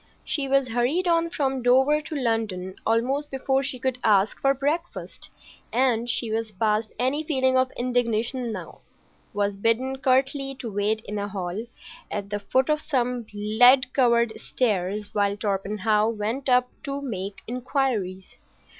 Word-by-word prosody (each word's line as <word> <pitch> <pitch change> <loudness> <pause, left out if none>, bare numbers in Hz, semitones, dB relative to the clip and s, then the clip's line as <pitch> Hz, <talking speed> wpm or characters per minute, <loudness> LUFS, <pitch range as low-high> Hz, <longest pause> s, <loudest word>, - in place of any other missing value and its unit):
She 280 -4 -1
was 270 -1 +2
hurried 250 +10 +1
on 335 -1 +2
from 270 -5 -1
Dover 265 +5 +4
to 310 0 -7
London 220 -8 -1
almost 260 +6 +1
before 265 0 0
she 270 -1 -3
could 255 0 -2
ask 205 -1 +3
for 275 0 +3
breakfast, 310 +6 -3 0.4
and—she 235 -2 +1
was 225 0 -2
past 215 +2 0
any 260 +6 0
feeling 260 -4 +1
of 255 0 +3
indignation 245 0 0
now—was 200 +1 -6
bidden 240 +6 +1
curtly 270 +1 +1
to 240 -3 -6
wait 210 +2 0
in 210 -1 -5
a 200 - -2
hall 195 +2 -4 0.4
at 200 0 -5
the 205 - -1
foot 260 +7 +1
of 300 - +2
some 250 -6 -1
lead 245 +6 +4
covered 235 -3 +3
stairs 205 -3 -1
while 200 -1 +1
Torpenhow 210 +1 0
went 230 +5 -2
up 250 0 +4
to 280 -2 -4
make 200 -6 -5
inquiries. 240 -7 -2
240 Hz, 145 wpm, -25 LUFS, 210-265 Hz, 0.4 s, Dover